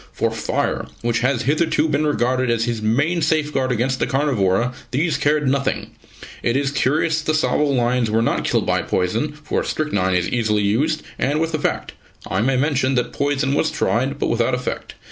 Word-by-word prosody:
For -, -, -1 dB
fire -, -, -2 dB, 0.2 s
which 115 Hz, -1 st, +1 dB
has 125 Hz, 0 st, +1 dB
hitherto 155 Hz, +3 st, +1 dB
been 155 Hz, 0 st, +1 dB
regarded 130 Hz, -2 st, +1 dB
as 115 Hz, -1 st, +1 dB
his 120 Hz, -2 st, -2 dB
main 145 Hz, +11 st, +1 dB
safeguard 150 Hz, -4 st, +1 dB
against 125 Hz, +2 st, 0 dB
the -, -, 0 dB
carnivora 125 Hz, -5 st, +1 dB, 0.2 s
these 150 Hz, +4 st, 0 dB
cared 145 Hz, 0 st, +1 dB
nothing. 140 Hz, 0 st, -1 dB, 0.5 s
It 120 Hz, +2 st, +1 dB
is 140 Hz, 0 st, 0 dB
curious 155 Hz, +4 st, +1 dB
that 155 Hz, -, -1 dB
the -, -, +3 dB
Tsavo 150 Hz, -1 st, +1 dB
lions 125 Hz, -4 st, +1 dB
were 110 Hz, +1 st, +2 dB
not -, -, 0 dB
killed -, -, +1 dB
by -, -, +1 dB
poison, 110 Hz, +11 st, -1 dB
for -, -, -1 dB
strychnine 100 Hz, -12 st, 0 dB
is 90 Hz, -1 st, +1 dB
easily 110 Hz, -3 st, +1 dB
used, 145 Hz, +10 st, +1 dB, 0.2 s
and 145 Hz, +3 st, +1 dB
with 165 Hz, 0 st, -1 dB
effect. 155 Hz, -, -2 dB, 0.3 s
(I 95 Hz, -, -1 dB
may 130 Hz, +3 st, +2 dB
mention 135 Hz, -1 st, +1 dB
that 125 Hz, -, -1 dB
poison 140 Hz, -1 st, 0 dB
was 150 Hz, +2 st, +2 dB
tried, 130 Hz, +4 st, 0 dB
but -, -, -1 dB
without 120 Hz, +1 st, +1 dB
effect. 125 Hz, 0 st, -5 dB
135 Hz, 185 wpm, -21 LUFS, 120-150 Hz, 0.5 s, the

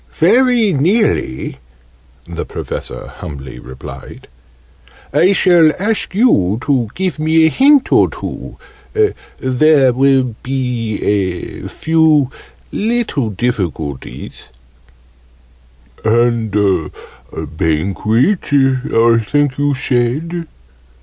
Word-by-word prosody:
"Very 235 Hz, +3 st, +3 dB
nearly," 165 Hz, -, 0 dB, 0.7 s
the 85 Hz, -1 st, -5 dB
Professor -, -, -6 dB
humbly 65 Hz, -4 st, -9 dB
replied. 65 Hz, +1 st, -11 dB, 0.9 s
"I 185 Hz, +3 st, +4 dB
shall 175 Hz, -5 st, +4 dB
ask 205 Hz, -1 st, -2 dB
you 110 Hz, -, +3 dB
to 130 Hz, -6 st, 0 dB
give 185 Hz, -5 st, -2 dB
me 160 Hz, +1 st, +3 dB
a -, -, +4 dB
hint 280 Hz, -, +4 dB
or -, -, +4 dB
two -, -, -8 dB, 0.8 s
there 130 Hz, 0 st, +3 dB
will 130 Hz, -2 st, +2 dB
be 125 Hz, -4 st, -2 dB
a 95 Hz, -4 st, -2 dB
few 160 Hz, -4 st, +2 dB, 0.4 s
little 220 Hz, -, -1 dB
difficulties 90 Hz, -, -4 dB, 0.8 s
" -, -, -31 dB
"And 115 Hz, 0 st, +2 dB, 0.8 s
Banquet, 100 Hz, -, 0 dB
I 130 Hz, -4 st, +3 dB
think 145 Hz, +4 st, 0 dB
you 145 Hz, -1 st, +1 dB
said?" 140 Hz, +7 st, -1 dB
130 Hz, 90 wpm, -16 LUFS, 105-160 Hz, 0.9 s, I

